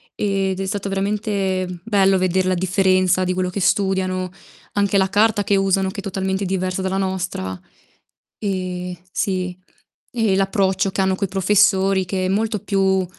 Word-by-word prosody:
ed 195 -2 -1
è 195 - -2
stato 200 0 -3
veramente 195 -2 -1
bello 195 -3 +3
veder 185 0 +1
la 185 - +2
differenza 185 0 +2
di 185 0 0
quello 185 0 -1
che 195 +1 -4
studiano, 185 -2 +1 0.4
anche 200 -1 +2
la 190 -1 +2
carta 205 0 +3
che 200 - +2
usano 195 0 +2
che 200 - -7
è - - -21
totalmente 190 0 -2
diversa 185 0 -1
dalla 190 0 -1
nostra. 185 - -3 0.8
Ehm, 185 -3 -3 0.2
sì, 185 -2 -2 0.5
e 225 -5 +1
l'approccio 195 0 +1
che 195 - -1
hanno 190 0 +2
coi 200 0 -2
professori 195 0 +3
che 185 0 -2
è - - 0
molto 215 +2 0
più 190 -2 +1
190 Hz, 160 wpm, -21 LUFS, 185-195 Hz, 0.8 s, bello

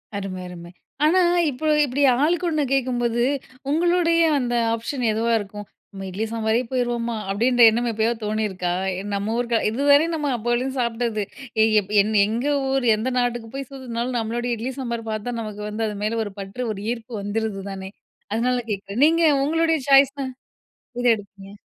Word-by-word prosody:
அரும, 195 -2 -4
அரும. 175 -1 -10 0.4
ஆனா, 340 +5 +4 0.3
இப்ப 270 +3 -8 0.2
இப்டி 280 +2 -1 0.2
ஆளுக்கு 350 +3 +1
ஒண்ணு 305 -2 0
கேட்கும்போது, 240 -3 +1 0.5
உங்களுடைய 335 +2 +3 0.2
அந்த 245 -1 -2 0.2
ஆப்ஷன் 245 +3 -4
எதுவா 225 +2 0
இருக்கும். 205 +1 -8 0.3
நம்ம 195 -1 -7
இட்லி 200 +4 -3
சாம்பாரே 225 +1 +1
போயிருவோமா? 240 -2 -1 0.2
அப்டின்ற 245 +4 +2
எண்ணம் 240 +2 -1
எப்பயோ 220 +1 +1
தோணியிருக்கா? 210 -4 -1 0.4
நம்ம 200 +2 -1
ஊரு 235 -1 +1
இது 230 +6 -3
வரையும் 320 +4 +4
நம்ம 295 -3 -1
அப்போலேந்து 240 +4 -1
சாப்பிட்டது. 235 -2 -1 0.4
ஏய் 220 0 +3 0.3
எங் 215 +2 -1
எங்க 230 +6 -2 0.2
ஊர், 265 -2 0
எந்த 220 +4 -2
நாட்டுக்கு 240 -2 -2
போய் 275 -2 -5
சுத்துனாலும் 250 -2 -3
நம்மளுடைய 240 +2 -2
இட்லி, 240 +4 -3
சாம்பார் 235 -3 -4
பார்த்தா 215 +3 -3
நமக்கு 210 -1 -6
வந்து 220 +2 -2
அது 210 - -4
மேல 225 +2 0
ஒரு 205 - -7
பற்று 195 +6 -5
ஒரு 200 - -8
ஈர்ப்பு 240 0 -6
வந்துருது 205 -1 -3
தானே! 190 0 -7 0.4
அதனால 250 +3 +1
கேட்கிறேன் 200 +4 -1
நீங்க 330 +2 +3 0.2
உங்களுடைய 325 0 +2
சாய்ஸ்னா, 275 0 +5 0.7
எத 245 - -2
எடுப்பீங்க? 200 -1 -12
235 Hz, 155 wpm, -23 LUFS, 215-260 Hz, 0.7 s, சாய்ஸ்னா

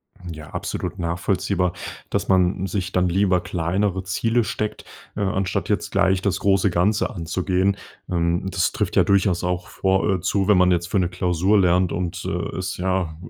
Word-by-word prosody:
Hm, 90 -2 -9
ja, 75 -2 -10
absolut - - -4
nachvollziehbar, 90 +1 0 0.4
dass - - -1
man 95 0 +2
sich 90 -1 -3
dann 90 -1 +2
lieber 95 0 +2
kleinere 95 +2 -1
Ziele 115 +5 +1
steckt, 105 0 -4 0.3
äh, 105 - -3
anstatt 95 -1 -1
jetzt - - -1
gleich 95 0 +2
das 95 -1 0
große 100 0 +3
Ganze 95 +5 +1
anzugehen. 95 +3 0 0.3
Ähm, 85 +1 0
das - - +1
trifft - - -2
ja - - +6
durchaus 95 -3 +2
auch 90 0 -2
vor 95 +1 0
äh, - - -3
zu, 95 +2 0
wenn 105 - +5
man 90 0 +4
jetzt 85 -1 +1
für 95 - 0
'ne 90 -2 +1
Klausur 90 +4 +1
lernt 90 -1 +3
und, 90 +1 -3
äh, - - -3
es 95 -1 -3
ja 90 -3 -1
90 Hz, 180 wpm, -22 LUFS, 90-95 Hz, 0.4 s, ja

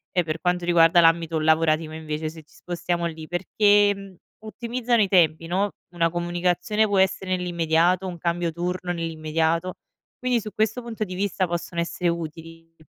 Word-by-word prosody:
e 180 - +3
per 160 0 -4
quanto 180 0 0
riguarda 170 0 +5
l'ambito 165 -1 +3
lavorativo 155 0 +2
invece 155 0 -4
se 160 -1 -12
ci - - -27
spostiamo 175 -1 -3
lì, 160 -1 -8
perché 200 +1 +2 0.3
ottimizzano 235 +1 -1
i 200 - +3
tempi, 165 -3 +3
no: 195 +4 0 0.2
una 165 -1 +2
comunicazione 175 +4 0
può 200 -2 +1
essere 190 0 +1
nell'immediato, 175 +1 +1
un 175 -2 -6
cambio 170 0 -1
turno 180 +2 -3
nell'immediato. 165 +1 -1 0.5
Quindi, 250 -1 +1
su 215 -1 -7
questo 220 +3 0
punto 225 -2 -4
di 185 -3 -6
vista, 190 -1 -1
possono 170 0 -3
essere 175 +1 -1
utili. 165 0 -7
175 Hz, 160 wpm, -24 LUFS, 165-190 Hz, 0.5 s, riguarda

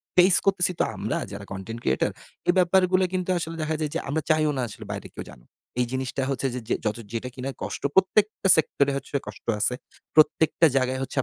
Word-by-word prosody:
Face 180 0 +7
করতেছি 185 -2 +3
তো - - +4
আমরা, - - -2
যারা - - -7
content 95 +5 -6
creator, 65 - +1 0.4
এই 175 - +5
ব্যাপারগুলো 185 +1 +3
কিন্তু 185 0 -2
আসলে 165 0 -4
দেখা 155 0 -1
যায় 150 -2 -2
যে - - +1
আমরা 155 +2 0
চাইও 155 -1 +2
না 125 - 0 0.3
বাইরে 100 - -6
কেউ - - -7
জানুক। - - -16 0.3
এই 125 - +3
জিনিসটা 130 +1 -3
হচ্ছে 135 0 -1
যে - - -3 0.3
যত 105 +2 0 0.2
যেটা 120 +2 -3
কিনা 130 +1 -4
কষ্ট 105 +3 -5
প্রত্যেকটা 195 +1 +2
সেক্টরে 140 -2 +1 0.4
কষ্ট - - -10
আছে। 125 - +2 0.4
প্রত্যেকটা 160 +1 +4
জায়গায় 130 0 0
আপনাকে 135 - -4
150 Hz, 185 wpm, -25 LUFS, 125-180 Hz, 0.4 s, Face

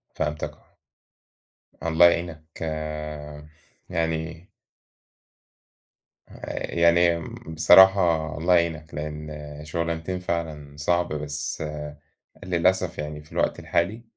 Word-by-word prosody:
فهمتَك 75 0 -2 1.3
آه. - - -1
الله 80 +1 +6
يعينك 85 -2 -4 1.3
يعني 80 +1 -2 1.8
آآ 300 -1 -6
يعني 85 0 +4 0.3
بصراحة 85 -2 +6
الله 90 +3 +3
يعينك، 85 -2 0
لإن 75 0 -5 0.3
شُغلانتين 85 +3 -2
فعلًا 80 -5 -4
صعب، 85 +3 +1
بس 75 0 -3 0.8
للأسف 90 0 +1
يعني 75 0 -5
في 75 - -22
الوقت - - 0
الحالي 100 +7 -1
85 Hz, 85 wpm, -25 LUFS, 75-85 Hz, 1.8 s, الله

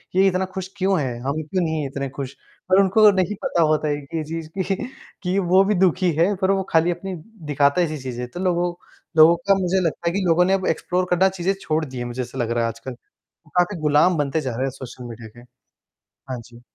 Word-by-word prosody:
ये 195 +1 +5
इतना 190 0 +1
खुश 190 -1 -4
क्यों 190 -2 +2
है, 125 -4 -3
हम 140 +5 -2
क्यों 180 +4 -1
नहीं 160 -1 -1
हैं 140 - -2
इतने 140 0 -4
खुश? 135 0 -6 0.4
पर 185 - +6
उनको 210 +3 +6
नहीं 195 +1 0
पता 170 - +1
होता 155 -1 +2
है 145 - 0
कि 145 +4 -6
ये 160 - -1
चीज़ 160 +1 -6
कि 190 +1 0 0.5
कि, 180 +1 0
वो 185 +1 +4
भी 205 +2 +1
दुखी 185 0 +3
है 185 +5 +4
पर 190 0 +3
वो 195 -1 +1
खाली 165 +2 +3
अपनी 185 +2 -5 0.3
दिखाता 145 +3 +3
ऐसी 155 -3 -1
चीज़ें। 125 -1 -5
तो 175 - -7
लोगों, 175 -1 0 0.4
लोगों 160 +2 +8
का 195 - +6
मुझे 185 +1 +1
लगता 165 +1 -2
है - - -4
कि 200 - 0
लोगों 170 +1 +4
ने 190 - +2
अब 190 -1 0
एक्सप्लोर 180 +3 0
करना 185 +2 +4
चीज़ें 190 +1 -1
छोड़ 155 0 0
दी 130 -3 -9
है, 120 - -3
मुझे 120 +1 -4
ऐसा 120 -1 -7
लग 120 -1 -1
रहा 120 0 +1
है 115 - +1
आजकल। 115 +3 -8 0.6
काफ़ी 180 +2 +2
गुलाम 155 +4 +3
बनते 145 +1 0
जा 130 -3 -3
रहे 130 - -2
हैं 135 - -1
सोशल 130 -1 -10
मीडिया 115 -1 -9
के। 120 +3 -16 0.9
हाँ 125 - -4
जी। 120 0 -15
165 Hz, 240 wpm, -22 LUFS, 140-185 Hz, 0.9 s, लोगों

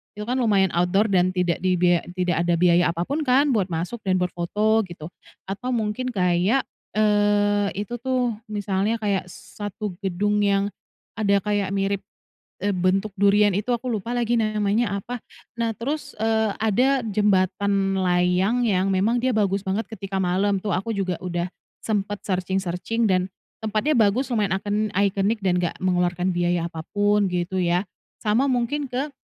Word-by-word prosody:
itu 210 - -5
kan 250 +3 -1
lumayan 200 -6 +3
outdoor 180 +5 +2
dan 180 -1 +3
tidak 180 -2 0
dibiaya 180 -1 +3 0.2
tidak 180 -3 0
ada 175 - +3
biaya 175 0 +4
apa 170 - -2
pun 285 - -2
kan 275 +3 +4
buat 205 -6 +1
masuk 175 +7 -4
dan 185 - +3
buat 180 0 -1
foto 210 +6 +1
gitu. 170 -1 -9 0.4
Atau 230 +6 -4
mungkin 220 +3 -2
kayak, 185 +4 +2 0.3
eee, 205 -1 +3 0.2
itu 240 +2 -6
tuh, 250 -2 0
misalnya 205 0 -1
kayak 200 -3 -1
satu 205 +2 -7
gedung 205 +2 0
yang 200 0 +1 0.5
ada 200 -2 +3
kayak 205 -2 0
mirip, 195 0 0 0.6
eee, 205 - +1
bentuk 190 +3 +1
durian 205 +1 +5
itu, 205 +6 -2
aku 245 +2 -3
lupa 225 +3 -3
lagi 240 0 +1
namanya 215 0 0
apa. 245 +2 -6 0.4
Nah, 230 -1 0
terus, 290 +6 -4
eee, 220 -1 +1
ada 245 +5 +2
jembatan 195 -1 +1
layang 180 +6 +2
yang 195 -4 +2
memang 200 +6 +2
dia 255 +1 +1
bagus 200 -1 +1
banget 195 +4 -1
ketika 195 -2 -5
malam 195 +3 +1
tuh, 205 - -2
aku 195 +6 -1
juga 185 -3 -2
udah 175 -1 -2 0.4
sempet 205 -2 -2
searching-searching 190 +4 -1
dan 185 0 +1 0.3
tempatnya 220 +7 0
bagus 225 +6 +2
lumayan 205 -4 +1
icon 210 +2 -1
iconic 200 +2 +1
dan 180 -1 +2
nggak 175 -2 -2
mengeluarkan 180 0 +1
biaya 175 -1 0
apa 160 - -7 0.2
pun 205 -1 +3
gitu 180 +1 -2
ya, 175 +1 +1 0.3
sama 230 +6 +1
mungkin 260 +3 0
ke 270 +4 -3
200 Hz, 160 wpm, -23 LUFS, 185-220 Hz, 0.6 s, durian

